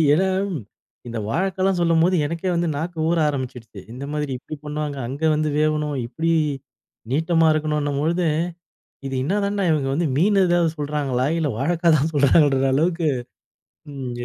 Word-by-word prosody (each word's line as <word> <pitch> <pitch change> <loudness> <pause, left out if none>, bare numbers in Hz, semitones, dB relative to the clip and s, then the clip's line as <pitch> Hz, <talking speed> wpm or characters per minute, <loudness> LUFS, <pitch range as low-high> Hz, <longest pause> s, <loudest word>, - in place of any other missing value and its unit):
ஏன்னா 190 +4 +2 0.8
இந்த 115 -1 -4
வாழைக்காலாம் 190 - 0
சொல்லும்போது 170 +2 +3
எனக்கே 170 +4 -3
வந்து 170 0 0
நாக்கு 165 +3 -4
ஊற 170 0 +2
ஆரம்பிச்சுடுச்சு, 125 -7 -5
"இந்த 130 +3 -7
மாதிரி 150 -2 -2
இப்பிடி 155 +4 -8
பண்ணுவாங்க, 150 -1 -3
அங்கே 145 +5 -2
வந்து 155 0 0
வேவணும், 150 -1 0
இப்டி 165 +7 -2 0.8
நீட்டமா 160 +3 +2
இருக்கணுன்னும்" 150 -2 -1
பொழுது, 170 +2 +1 0.8
"இது 135 - -4
என்னதாண்டா! 200 +4 0
இவுங்க 140 -3 0
வந்து 165 +2 +1
மீன் 195 +6 +3
எதாவது 175 -1 +2
சொல்கிறாங்களா? 145 -4 -1
இல்ல 155 -3 0
வாழைக்காய் 165 +3 +2
தான் 155 +4 0
சொல்றாங்களான்ற" 140 -1 +4
அளவுக்கு 165 +2 +1 0.8
ம் 130 -3 -5
155 Hz, 140 wpm, -22 LUFS, 140-170 Hz, 0.8 s, சொல்றாங்களான்ற